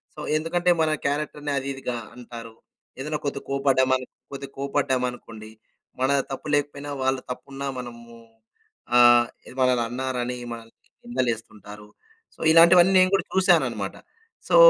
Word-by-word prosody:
So, - - -11 0.2
ఎందుకంటే 175 +3 +1
మన 155 -1 +2
క్యారెక్టర్‌ని 145 0 -2
అది 135 +1 -3
ఇదిగా 125 -2 -4 0.2
అంటారు. 115 -2 -10 0.4
ఏదైనా 150 +2 -2
కొద్దిగా 140 -1 -3
కోప్పడ్డామను, 130 -2 +2 0.3
కొద్దిగా 140 0 -8
కోప్పడ్డామనుకోండి, 125 -5 -2 0.5
మన 130 - +2 0.2
తప్పు 135 +3 -6
లేకపోయినా 145 0 -2
వాళ్ళు 130 0 +1
తప్పున్నా 140 +2 -6
మనము 120 -1 -10 0.8
ఆహ్, 120 0 +7 0.2
ఏది 130 - -12
మనని 125 -2 +3
అన్నారని 125 -1 -3 0.2
మనల్ని 115 -1 -9 0.3
నిందలేస్తుంటారు. 110 - -4 0.5
సో, - - -27
ఇలాంటివన్నీ 175 +3 +7
నేను 185 +1 +4
కూడా 190 - -1
చూసానన్నమాట. 135 - +2 0.5
సో, - - +2
130 Hz, 125 wpm, -24 LUFS, 120-145 Hz, 0.8 s, ఆహ్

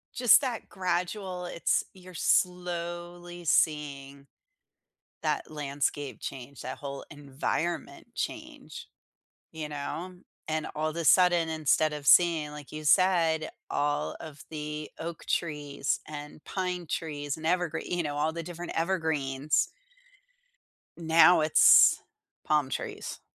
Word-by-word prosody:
Just 245 +1 +6
that 250 -5 -3
gradual 180 0 -2
it's 170 - 0
you're 185 -1 -14
slowly 175 0 -1
seeing 140 -3 0 0.9
that - - -1
landscape 145 -3 -3
change, 135 0 -8
that - - -6
whole 140 -1 -6
environment 145 +4 -3
change, - - -6 0.7
you 155 -2 -5
know? 155 +5 -5 0.3
And 155 -1 -1
all 155 +1 -1
the 170 +1 -4
sudden, 175 0 +5
instead 155 -1 +2
of 150 -1 -6
seeing, 160 -2 +5
like 150 -2 -10
you 155 0 -7
said, 165 -2 +3 0.2
all 145 +1 -1
of 150 -2 -10
the 150 -1 -5
oak 165 0 -6
trees 150 -3 -1
and 150 0 -9
pine 180 -2 -3
trees 145 -3 -3
and 160 0 -7
evergree 175 -1 0
you 175 -1 -1
know, 145 -1 -3
all 155 +2 0
the 170 +1 -5
different 175 +1 -7
evergreens. 155 -5 0 1.3
Now, 165 +1 +6
it's 155 0 +7 0.4
palm 150 -3 +2
trees. - - -5
160 Hz, 120 wpm, -28 LUFS, 150-175 Hz, 1.3 s, it's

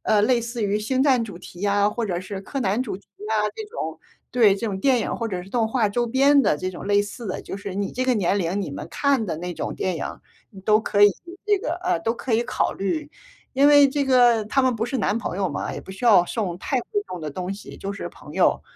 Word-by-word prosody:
呃， 210 -1 +3
类 240 +2 +3
似 235 0 -4
于 205 +1 0
星 260 +5 +1
战 265 -4 +4
主 205 -6 -7
题 175 +1 -11
啊， 205 +1 +3
或 230 +1 -2
者 180 -3 -1
是 190 +2 -6
柯 270 +8 -5
南 210 +2 +1
主 220 -7 -4
题 200 - -20 0.2
啊 220 - +1 0.2
这 440 - -5
种， 455 +4 -5 0.3
对， 220 -6 +4
这 230 - -3
种 195 -3 -3
电 255 +1 +3
影 - - -2
或 230 - -3
者 185 -4 -4
是 190 - -14
动 230 -1 +1
画 225 -1 +2
周 240 +3 0
边 275 +4 +5
的 205 - +2
这 185 +5 -3
种 180 - -8
类 205 0 +3
似 210 +3 -8
的， 185 - -4
就 195 - -6
是 200 -1 -6
你 200 0 -2
这 255 - -2
个 255 - +3
年 200 -2 +1
龄， 190 +2 -1
你 150 - -5
们 145 +2 -6
看 275 +1 +1
的 165 - -3
那 175 +2 -5
种 - - -4
电 185 -2 -2
影， - - -3 0.5
你 195 -4 -12
都 215 +2 +4
可 205 -1 +1
以 205 - +9 0.3
这 415 -2 +3
个 340 -3 -2
呃， - - +1
都 225 +7 0
可 245 +1 -4
以 225 +1 +3
考 240 - -1
虑。 295 +10 -3 0.4
因 275 +2 +5
为 290 -1 +7
这 280 +1 0
个 245 -4 +4
他 270 +5 +2
们 255 -2 +2
不 225 +1 -1
是 265 - -2
男 215 +1 +1
朋 210 - -4
友 190 -2 0
嘛， - - -3
也 - - -6
不 - - -12
需 195 +6 -7
要 195 -6 +7
送 185 -4 -3
太 265 +7 -1
贵 415 - -3
重 180 - -6
的 155 - -4
东 180 +5 -4
西， 200 - -10
就 195 - -5
是 200 - -6
朋 - - -13
友。 - - +2
215 Hz, 290 characters per minute, -23 LUFS, 195-250 Hz, 0.5 s, 以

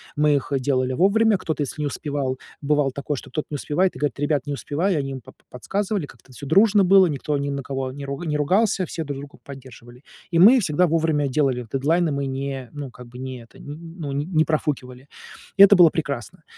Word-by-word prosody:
мы 150 0 +3
их, 140 - -3
э, 135 - +1
делали 130 -1 0
вовремя, 205 - +3
кто-то, 155 -4 -3
если 150 +2 -6
не 145 - 0
успевал, 140 -2 -3 0.2
бывало 145 -2 +1
такое, 140 +1 -4
что - - -10
кто-то 155 - -3
не 150 - -4
успевает, 175 +6 0
и - - -9
говорит: 145 -3 -2
"Ребят, 145 -2 0
не 145 - -3
успеваю". 165 +7 -1
Они 135 -1 -3
им 130 -2 -6
по - - -14
по - - -33
подсказывали, 195 - -3
как-то 135 - -18
это - - -15
всё 140 - -8
дружно 200 +6 +4
было, 190 0 +6
никто 150 -1 -2
ни 140 0 -2
на 140 -1 -4
кого 135 -1 -4
не 140 +1 -8
руг 140 +5 -5
не 150 -1 0
ругался, 185 +5 +1
все 165 - -5
друг 140 -2 -5
друга 140 0 -11
поддерживали. 125 -3 -12 0.3
И 165 - +1
мы 235 +8 +8
всегда 180 -2 +2
вовремя 155 -3 +1
делали 130 -3 0
дедлайны, 160 +5 +1
мы 140 0 -2
не, 135 -2 -4
ну, 145 -3 -7
как 125 0 -13
бы 120 +1 -13
не 130 -1 -6
это, 115 - -19
нь 165 +3 -10
ну, 145 -3 -4
не 140 +1 -2
не 160 -2 +2
профукивали. 140 -5 -3 0.5
И 200 - +10
это 200 -1 +7
было 175 -2 +8
прекрасно. 140 - -5
145 Hz, 230 wpm, -23 LUFS, 135-165 Hz, 0.5 s, И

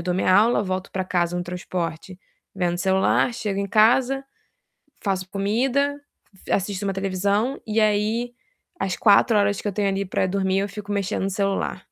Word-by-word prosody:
eu - - -5
dou 180 0 -1
minha 185 0 +2
aula, 220 +2 +4
volto 185 -1 -3
para 190 0 -2
casa 175 -1 0
no 175 - -2
transporte, 175 0 -5 0.4
vendo 180 -2 0
o - - -9
celular. 190 +6 +2
Chego 210 -5 -2
em 200 - -2
casa, 250 +6 +3 0.8
faço 190 -2 -2
comida, 260 +9 0 0.5
assisto 200 0 -1
uma 195 - -1
televisão, 200 +7 -1
e 215 +1 +1
aí, 215 +3 +1 0.5
as 185 -2 -1
4 215 +1 +5
horas 205 -1 +2
que - - -4
eu 200 - -2
tenho 200 0 0
ali 195 0 -1
para 185 - 0
dormir, 190 0 0
eu 200 +1 -2
fico 205 0 -7
mexendo 200 -1 -1
no 195 - 0
celular. 195 0 -1
200 Hz, 180 wpm, -23 LUFS, 185-215 Hz, 0.8 s, 4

